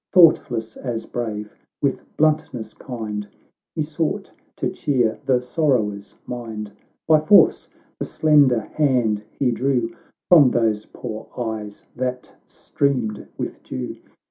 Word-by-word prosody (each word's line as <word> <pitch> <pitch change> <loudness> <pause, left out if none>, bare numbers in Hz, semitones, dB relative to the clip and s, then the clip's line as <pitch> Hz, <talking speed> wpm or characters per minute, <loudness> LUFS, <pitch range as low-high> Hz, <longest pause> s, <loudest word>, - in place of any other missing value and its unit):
Thoughtless 120 - +4
as 120 -4 -4
brave, 105 -3 -4 0.3
with 140 -2 0 0.2
bluntn<ws 150 -8 +1
kind 105 -5 -5 0.5
He 155 - 0
sought 155 +1 -2 0.2
to - - -1
cheer 120 -6 0
the 125 -2 +3
sorrower's 125 -8 0
mind; 110 -4 -6 0.4
By 155 -1 +6
force 200 +7 +5 0.3
the - - -2
slender 145 -7 +4
hand 115 -5 +1
he 130 +1 0
drew 125 -1 0 0.3
From 155 -7 +8
those 110 -3 +1
poor 110 -3 -7
eyes 110 -4 -5
that 125 0 -4
streamed 125 -7 -1
with - - -5
dew. 65 -1 -5
120 Hz, 115 wpm, -22 LUFS, 110-140 Hz, 0.5 s, From